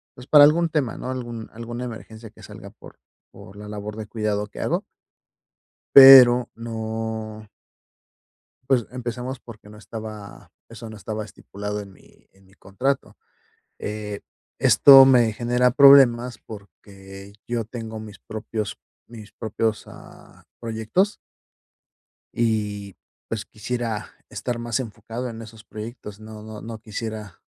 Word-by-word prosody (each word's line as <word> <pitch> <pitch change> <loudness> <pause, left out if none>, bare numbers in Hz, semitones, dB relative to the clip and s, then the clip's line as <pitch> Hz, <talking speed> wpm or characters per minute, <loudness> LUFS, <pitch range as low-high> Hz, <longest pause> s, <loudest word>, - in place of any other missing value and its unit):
pues, 125 - -12
para 145 +1 +7
algún 165 +3 +4
tema, 145 -7 -2
¿no?, 130 - -5
algún 120 -3 -6
alguna 120 +2 -7
emergencia 110 -1 -10
que - - -19
salga - - -12
por - - -16 0.3
por 95 - -14
la 105 0 -10
labor 105 0 -7
de 110 -1 -7
cuidado 105 -2 -2
que - - -12
hago - - -1 1.1
pero 130 -3 +10
no 110 -1 -6 1.2
Pues, 125 -4 +2
empezamos, 125 +1 -5
porque 110 -3 -14
no 105 0 -14
estaba 110 -1 -10 0.2
eso 115 - -10
no - - -10
estaba 105 +1 -6
estipulado 105 0 -7
en 100 -1 -12
mi 95 - -23
en 95 0 -25
mi 95 - -24
contrato. 125 +8 -3 0.6
Eh, 105 -1 -6 0.4
esto 135 -1 +8
me 125 -4 +4
genera 125 +2 +1
problemas, 125 -3 +6
porque 100 -1 -13
yo 120 -1 -2
tengo 110 0 -8
mis 105 -1 -11
propios 110 -1 -6 0.3
mis 110 -3 -12
propios, 110 0 -3
ah, - - -16 0.2
proyectos 115 - -1 1.2
y, 105 -4 -2 0.3
pues, 110 -1 -4
quisiera 115 0 -5 0.2
estar 120 -1 -4
más 120 +2 -2
enfocado 115 +1 -6
en 115 -1 -9
esos 110 -1 -13
proyectos. 110 -2 -9
No 110 0 -11
no 110 -1 -9
no 115 -1 -8
quisiera 110 -3 -7
110 Hz, 135 wpm, -23 LUFS, 105-120 Hz, 1.2 s, pero